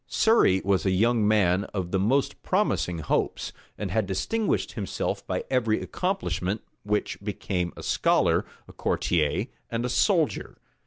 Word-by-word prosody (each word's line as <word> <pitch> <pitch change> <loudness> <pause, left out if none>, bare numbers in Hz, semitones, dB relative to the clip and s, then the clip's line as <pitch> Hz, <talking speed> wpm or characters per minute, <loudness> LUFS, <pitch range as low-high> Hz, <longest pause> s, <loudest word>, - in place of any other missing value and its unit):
Surrey 220 - +3
was 95 -2 +2
a 95 - +2
young 110 +3 +3
man 100 -3 +3
of 90 -3 -2
the 95 - +1
most 130 +8 +1
promising 90 -1 0
hopes, 80 - -1 0.2
and 100 -3 -4
had 110 -1 +1
distinguished 205 - -1
himself 100 -4 -3
by - - -2
every 115 -4 +2
accomplishment 145 - -2 0.2
which 105 -1 -2
became 95 -3 -2
a - - -8
scholar, - - +2 0.2
a - - -13
courtier, 75 -4 0 0.2
and 115 +1 -2
a - - -1
soldier. - - +1
100 Hz, 145 wpm, -26 LUFS, 95-115 Hz, 0.2 s, Surrey